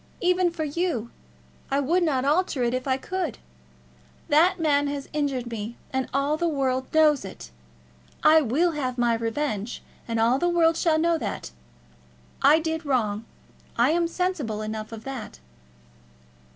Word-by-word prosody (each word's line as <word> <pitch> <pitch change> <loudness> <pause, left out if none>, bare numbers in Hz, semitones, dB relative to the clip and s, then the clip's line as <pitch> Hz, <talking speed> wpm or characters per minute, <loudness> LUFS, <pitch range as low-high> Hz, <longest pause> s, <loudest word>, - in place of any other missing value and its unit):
Even 360 0 +2
for 335 -2 -4
you 295 -6 -2 0.6
I 275 - +1
would 330 +7 +2
not 275 -6 +1
alter 300 -3 +1
it 240 0 +1
if 255 +1 -2
I 260 -1 +2
could. 345 - -3 0.9
That 335 +5 +4
man 290 -3 +2
has 280 -1 -4
injured 270 -5 -1
me, 225 +1 -5 0.2
and 265 0 -1
all 280 +3 +1
the 345 +1 0
world 260 -4 -1
knows 305 -4 +4
it. 185 - -10 0.7
I 315 +1 +7
will 305 +7 +2
have 260 -5 -3
my 240 -1 +2
revenge, 230 -1 -2 0.2
and 230 -1 -1
all 235 +4 +3
the 350 - +1
world 330 -1 +3
shall 325 -2 +2
know 335 +1 +2
that. - - -5 0.9
I 300 - +6
did 320 0 -2
wrong; 225 -6 0 0.5
I 240 +5 +4
am 340 +1 +2
sensible 330 - -2
enough 215 0 -5
of 225 -1 -8
that." 265 -6 -7
285 Hz, 155 wpm, -25 LUFS, 240-325 Hz, 0.9 s, I